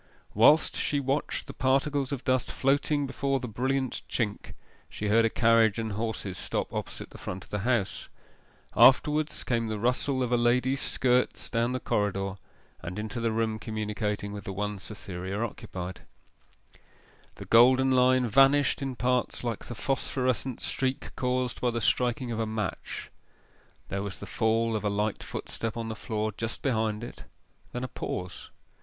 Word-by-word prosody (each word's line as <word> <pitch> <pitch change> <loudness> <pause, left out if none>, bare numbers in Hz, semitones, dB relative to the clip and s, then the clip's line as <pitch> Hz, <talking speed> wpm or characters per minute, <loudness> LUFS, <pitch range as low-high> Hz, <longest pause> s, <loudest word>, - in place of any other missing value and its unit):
Whilst 145 +9 +5
she 145 - +1
watched 140 +2 -1
the - - -8
particles 135 +1 +1
of 135 -3 -3
dust 130 -1 +1
floating 145 +2 +1
before 135 0 -1
the 125 - -5
brilliant 130 +3 -1
chink 105 -4 -2 0.3
she 105 - -3
heard 115 +2 +5
a - - +3
carriage 115 -2 +4
and 110 -1 -2
horses 105 -3 -3
stop - - -2
opposite - - -5
the - - -11
front 90 0 -6
of - - -20
the 105 - -1
house. 115 -2 -1 0.7
Afterwards 150 +4 +5
came 115 -2 0
the 110 -1 -2
rustle 125 +4 +1
of 125 - -2
a 120 - +4
lady's 125 +3 +2
skirts 125 -1 +1
down 120 +1 +1
the 130 - -1
corridor, 100 -3 -1 0.4
and 90 +4 -6
into 110 +2 -4
the 115 -1 0
room 110 -1 0
communicating 105 -1 -3
with 100 -1 -6
the 95 - -4
one 105 +1 -3
Cytherea 95 -1 -6
occupied. 95 -5 -5 1.3
The - - -9
golden 130 +3 +6
line 130 0 +4
vanished 135 +5 +4
in 135 -2 -3
parts 125 +2 0
like 115 -3 -3
the 120 - -7
phosphorescent 130 -1 -1
streak 130 0 -2
caused 125 -1 -1
by 125 - +2
the 120 0 -1
striking 120 +2 +1
of 115 - -3
a 110 - 0
match; 110 -2 -4 0.8
there 100 - -2
was 100 -2 -5
the - - -8
fall 115 +2 +1
of 105 - -2
a 105 - +1
light 105 +1 -1
footstep 115 0 -5
on 115 -1 -3
the 110 - -4
floor 110 0 -2
just 115 +1 -4
behind 110 -4 0
it: 120 - -8 0.5
then 125 - -4
a - - -2
pause. 90 -6 -5
115 Hz, 165 wpm, -28 LUFS, 105-130 Hz, 1.3 s, golden